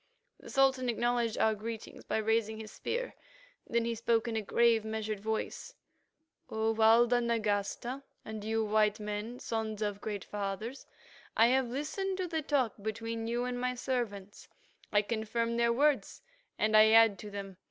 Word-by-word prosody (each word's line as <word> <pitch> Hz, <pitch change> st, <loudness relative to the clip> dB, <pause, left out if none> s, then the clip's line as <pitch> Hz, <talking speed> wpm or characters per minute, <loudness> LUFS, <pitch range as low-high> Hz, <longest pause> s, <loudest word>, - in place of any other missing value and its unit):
The -, -, -12 dB
Sultan 265 Hz, -2 st, +3 dB
acknowledged 240 Hz, -1 st, 0 dB
our 220 Hz, -, +3 dB
greetings 220 Hz, +1 st, -7 dB
by -, -, -1 dB
raising 220 Hz, 0 st, +1 dB
his 215 Hz, -1 st, -8 dB
spear. -, -, -3 dB, 0.6 s
Then 235 Hz, 0 st, +1 dB
he 235 Hz, -, 0 dB
spoke 230 Hz, 0 st, +1 dB
in 230 Hz, -, -2 dB
a 220 Hz, -, 0 dB
grave 230 Hz, +1 st, +3 dB
measured 220 Hz, -1 st, -3 dB
voice: 220 Hz, +2 st, -4 dB, 0.7 s
"O 220 Hz, 0 st, 0 dB
Walda 230 Hz, +2 st, +5 dB
Nagasta, 230 Hz, +3 st, -1 dB, 0.2 s
and 215 Hz, -1 st, -6 dB
you, 220 Hz, +1 st, 0 dB
white 215 Hz, 0 st, +2 dB
men, 210 Hz, +3 st, -4 dB
sons 220 Hz, -3 st, -3 dB
of 205 Hz, -1 st, -3 dB
great 205 Hz, -2 st, -4 dB
fathers, 210 Hz, +5 st, -5 dB, 0.5 s
I 225 Hz, +2 st, +6 dB
have 260 Hz, 0 st, +2 dB
listened 335 Hz, +10 st, -3 dB
to 370 Hz, -1 st, -2 dB
the 325 Hz, -2 st, -2 dB
talk 275 Hz, -7 st, +1 dB
between 225 Hz, +2 st, -3 dB
you 240 Hz, +1 st, -1 dB
and 245 Hz, 0 st, -3 dB
my 250 Hz, 0 st, 0 dB
servants; 220 Hz, -6 st, -4 dB, 0.4 s
I 205 Hz, 0 st, +4 dB
confirm 230 Hz, +2 st, -1 dB
their 235 Hz, 0 st, +3 dB
words 275 Hz, -3 st, +1 dB, 0.3 s
and 215 Hz, +1 st, +2 dB
I 215 Hz, 0 st, +8 dB
add 225 Hz, -3 st, +6 dB
to 210 Hz, -, -7 dB
them. 195 Hz, -2 st, -7 dB
225 Hz, 165 wpm, -31 LUFS, 215-240 Hz, 0.7 s, I